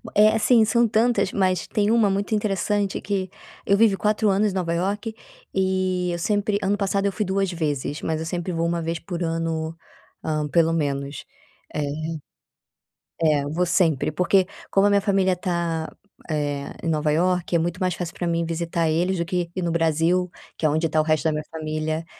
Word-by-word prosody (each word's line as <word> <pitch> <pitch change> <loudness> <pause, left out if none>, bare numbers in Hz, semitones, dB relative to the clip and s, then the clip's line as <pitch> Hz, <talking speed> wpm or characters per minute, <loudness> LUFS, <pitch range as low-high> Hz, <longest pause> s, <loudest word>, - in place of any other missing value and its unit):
É 210 +1 +7
assim 225 +1 +4
são 235 +1 +3
tantas 220 -2 +2
mas 185 -2 0
tem 210 0 +1
uma 225 -3 +4
muito 200 +2 -1
interessante 205 -1 0
que 190 -2 -2 0.4
eu 200 - +3
vive 220 -2 +5
4 210 +1 +1
anos 200 +2 +2
em 190 - -7
Nova 170 -3 -1
Iorque, 205 +6 -2 0.4
e 185 -1 0
eu 170 - -2
sempre 205 +2 0
ano 195 +2 +2
passado 200 0 0
eu 200 - +2
fui 210 - -2
2 195 -1 0
vezes 150 -3 -2
mas 160 -1 -1
eu 160 - -4
sempre 175 +2 -3
vou 165 -1 -1
1 170 0 0
vez 165 +1 -2
por 175 +1 -6
ano, 165 -1 -2 0.5
hã, 155 -1 -1
pelo 165 0 +3
menos, 140 -3 -2 0.5
eh, 150 - 0 1.4
é 150 -3 +3
eu 145 - -4
vou 175 +3 +1
sempre 165 -5 +2
porque 185 +1 +2 0.2
como 195 +1 +4
a - - +4
minha 200 0 +3
família 195 -2 +2
tá, 170 -3 -2 0.4
eh, 145 -2 -2
em - - -4
Nova 155 -1 +1
Iorque 180 +2 +1
é - - +1
muito 170 +2 -2
mais 185 -1 +1
fácil 175 -1 -5
pra 175 - -2
mim 170 0 0
visitar 165 0 -1
eles 175 +4 +1
do 170 - -1
que 175 -1 -2
ir 185 - -3
no 170 - -1
Brasil, 170 +2 +1 0.3
que - - -2
é - - +5
onde 160 +2 +1
está 155 0 +2
o - - -1
resto 155 0 +1
da 160 - +3
minha 150 0 -3
família 155 0 -3
175 Hz, 200 wpm, -23 LUFS, 160-195 Hz, 1.4 s, É